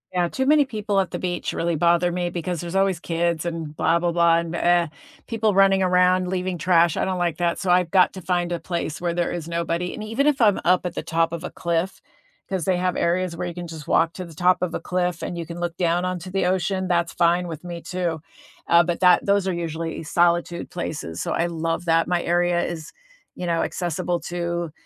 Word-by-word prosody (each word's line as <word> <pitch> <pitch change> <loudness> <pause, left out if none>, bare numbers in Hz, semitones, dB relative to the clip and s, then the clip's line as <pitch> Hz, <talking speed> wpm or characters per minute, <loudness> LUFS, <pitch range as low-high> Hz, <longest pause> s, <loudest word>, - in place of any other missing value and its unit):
Yeah, 175 -1 +1
too 265 +9 -2
many 295 +1 +5
people 210 -5 -1
at 190 - -1
the - - -4
beach 175 -1 -3
really 170 -1 -1
bother 170 +2 +3
me 175 0 -1
because 175 0 -3
there's 175 +2 -5
always 195 -3 +2
kids 170 -1 -1
and 165 -3 -4
blah 165 +2 +2
blah 175 0 0
blah 170 -1 +4
and 170 0 -4
m 170 - -2
eh, 175 -1 +3 0.4
people 220 -2 +1
running 195 0 +4
around, 180 0 +3
leaving 185 0 -2
trash, 170 -1 +3
I - - +1
don't 185 -1 -1
like 175 -3 -1
that, 175 -1 0
so 185 - 0
I've 180 -1 +3
got 185 -2 +5
to 190 - -8
find 175 0 -1
a 170 - -1
place 165 -2 -4
where 175 -1 -1
there 175 0 -1
is 170 -2 -5
nobody. 170 +1 -2
And 215 - -6
even 225 +7 0
if 285 -3 +2
I'm 210 -3 +4
up 180 +1 +3
at 175 - -3
the - - -2
top 165 0 +1
of 170 0 -5
a - - -4
cliff 170 +2 -2 0.5
'cause 190 -4 -2
they 185 - +2
have 180 0 -1
areas 175 0 0
where 180 - -3
you 175 - -5
can 175 0 -7
just 160 -2 -9
walk 165 0 +3
to 185 - -6
the 170 - -12
top 180 +3 +3
of 180 -2 -1
a - - -3
cliff 180 -2 -1
and 175 - -4
you 170 - -4
can 170 +1 -8
look 175 0 -3
down 175 0 +1
onto 185 0 -3
the 195 0 0
ocean, 185 +1 0
that's 170 -1 +1
fine 175 +1 +2
with 160 -1 -7
me 175 -1 -6
too. 175 -3 -3 0.5
Uh, 170 0 +6
but 175 0 -2
that 180 -1 +5
those 200 -1 +2
are 190 - 0
usually 165 -1 -4
solitude 175 +1 +1
places, 150 - -5
so - - -3
I 170 - +1
love 165 0 -2
that. 165 0 +3
My 175 -1 +1
area 175 0 +1
is, 160 -2 -5 0.4
you 180 - -5
know, 165 -1 +1
accessible 175 0 -2
to 170 0 -3
175 Hz, 240 wpm, -23 LUFS, 170-180 Hz, 0.5 s, Uh